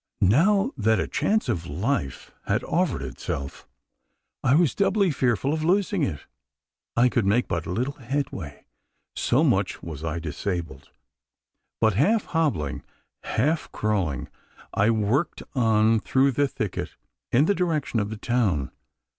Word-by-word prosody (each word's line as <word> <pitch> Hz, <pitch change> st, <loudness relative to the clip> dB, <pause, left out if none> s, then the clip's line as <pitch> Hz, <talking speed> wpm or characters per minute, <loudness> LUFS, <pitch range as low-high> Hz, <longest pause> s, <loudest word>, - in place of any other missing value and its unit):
Now 195 Hz, -, +4 dB
that 110 Hz, -1 st, +2 dB
a -, -, -1 dB
chance 215 Hz, +1 st, 0 dB
of 85 Hz, -1 st, -2 dB
life 70 Hz, -1 st, -2 dB, 0.2 s
had -, -, +1 dB
offered 165 Hz, -, 0 dB
itself, 70 Hz, +1 st, -6 dB, 0.8 s
I 130 Hz, -, +4 dB
was 165 Hz, -3 st, +3 dB
doubly 195 Hz, -2 st, +2 dB
fearful 130 Hz, 0 st, +1 dB
of 155 Hz, 0 st, -2 dB
losing 190 Hz, +2 st, +2 dB
it. 80 Hz, -, -2 dB, 0.7 s
I 120 Hz, +1 st, +6 dB
could 120 Hz, -2 st, +1 dB
make 115 Hz, +5 st, +2 dB
but 85 Hz, -2 st, -2 dB
little 125 Hz, +10 st, -1 dB
headway 115 Hz, -, -4 dB, 0.5 s
so -, -, +2 dB
much -, -, +1 dB
was 80 Hz, -3 st, -7 dB
I 80 Hz, 0 st, -2 dB
disabled 80 Hz, -3 st, -4 dB, 0.9 s
but 110 Hz, -2 st, +3 dB
half 205 Hz, -, +2 dB
hobbling, 145 Hz, -, -1 dB, 0.4 s
half 145 Hz, +1 st, 0 dB
crawling, 95 Hz, -, -1 dB, 0.5 s
I 100 Hz, +3 st, +3 dB
worked 115 Hz, +8 st, 0 dB
on 110 Hz, -3 st, +3 dB
through 135 Hz, +5 st, +2 dB
the 145 Hz, +3 st, +1 dB
thicket 110 Hz, -7 st, -4 dB, 0.4 s
in 135 Hz, +5 st, +4 dB
the 205 Hz, -, +3 dB
direction 160 Hz, -, 0 dB
of 105 Hz, -1 st, -1 dB
the 110 Hz, -, -5 dB
town. 100 Hz, -, 0 dB
115 Hz, 140 wpm, -25 LUFS, 90-150 Hz, 0.9 s, I